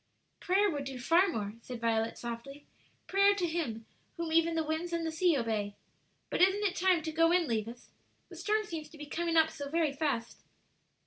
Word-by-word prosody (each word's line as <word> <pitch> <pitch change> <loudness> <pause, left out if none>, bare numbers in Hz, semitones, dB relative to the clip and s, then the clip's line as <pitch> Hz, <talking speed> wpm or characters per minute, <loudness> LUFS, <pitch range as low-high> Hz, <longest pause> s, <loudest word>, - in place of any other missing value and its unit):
"Prayer 390 +3 +3
would 290 -7 -2
do 270 -1 -5
far 335 +10 +4
more," 210 - -3
said 245 0 -7
Violet, 225 -1 0
softly 240 +5 -7 0.4
"prayer 395 +1 +4
to 370 -3 0
Him 300 -10 -3 0.3
whom 335 -1 -3
even 330 0 +3
the 325 - +1
winds 320 +3 -3
and 335 -1 -1
the 320 - -1
sea 330 -1 +2
obey. 215 -4 -2 0.6
But - - 0
isn't 385 +3 +4
it 385 -2 +1
time 365 -3 +2
to 320 - -3
go 330 +1 +3
in, 355 -1 +3
Levis? 230 +1 -4 0.4
the - - -12
storm 430 +1 0
seems 320 -6 -6
to 315 - -14
be 295 - -7
coming 335 +2 -1
up 320 0 +5
so 285 -1 -6
very 320 -2 +1
fast." 280 -6 -2
320 Hz, 200 wpm, -31 LUFS, 245-345 Hz, 0.6 s, up